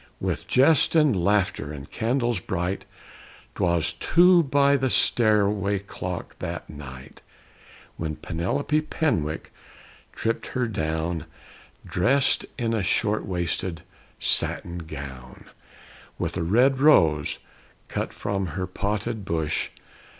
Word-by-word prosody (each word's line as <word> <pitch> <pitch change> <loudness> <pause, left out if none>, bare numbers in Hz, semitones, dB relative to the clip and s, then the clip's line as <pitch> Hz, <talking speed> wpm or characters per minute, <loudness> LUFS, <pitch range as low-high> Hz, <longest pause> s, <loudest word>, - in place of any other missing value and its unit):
_" - - -26 0.2
With - - -3
jest 145 +5 +4
and 150 -7 +4
laughter 90 -5 +1
and 70 -1 -8
candles 120 -1 0
bright, 95 0 -3 0.7
'Twas 85 -3 +1
two 175 +1 +5
by 140 -1 +3
the 130 -1 +1
stairway 105 -4 +3
clock 90 -2 -6
that - - -5
night, 65 -3 -11 0.8
When 80 -2 -3
Penelope 140 - -1
Penwick 115 - -2 0.6
tripped 115 +1 -2
her 125 - +2
down, 80 -5 -2 0.6
Dressed 135 +9 +2
in 115 -3 -1
a 110 - 0
short 105 +2 0
waisted 85 -2 -2 0.3
satin 85 0 0
gown, 70 -6 -9 0.7
With - - -3
a 90 - -1
red 125 +10 +3
rose 80 - +4 0.5
(cut - - -3
from 100 -2 -3
her 95 - -1
potted 105 +4 -3
bush). 80 -8 -1
95 Hz, 115 wpm, -25 LUFS, 80-120 Hz, 0.8 s, two